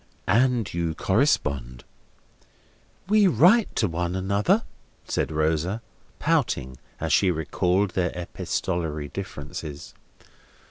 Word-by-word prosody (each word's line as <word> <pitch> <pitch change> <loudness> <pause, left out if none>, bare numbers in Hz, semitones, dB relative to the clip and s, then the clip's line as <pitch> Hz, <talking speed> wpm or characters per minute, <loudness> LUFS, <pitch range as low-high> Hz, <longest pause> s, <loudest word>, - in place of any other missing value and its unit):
And 120 +1 +2
you 85 -2 -1
correspond." 70 - 0 1.2
"We 210 0 +5
write 185 - +4
to 110 - +2
one 85 +1 -2
another," 100 - +1 0.4
said - - -1
Rosa, 80 +7 0 0.3
pouting, 65 0 0 0.2
as - - -1
she 95 - +4
recalled 90 +4 0
their 90 -1 0
epistolary 85 -3 -3
differences. 75 -5 -7
90 Hz, 95 wpm, -25 LUFS, 80-110 Hz, 1.2 s, We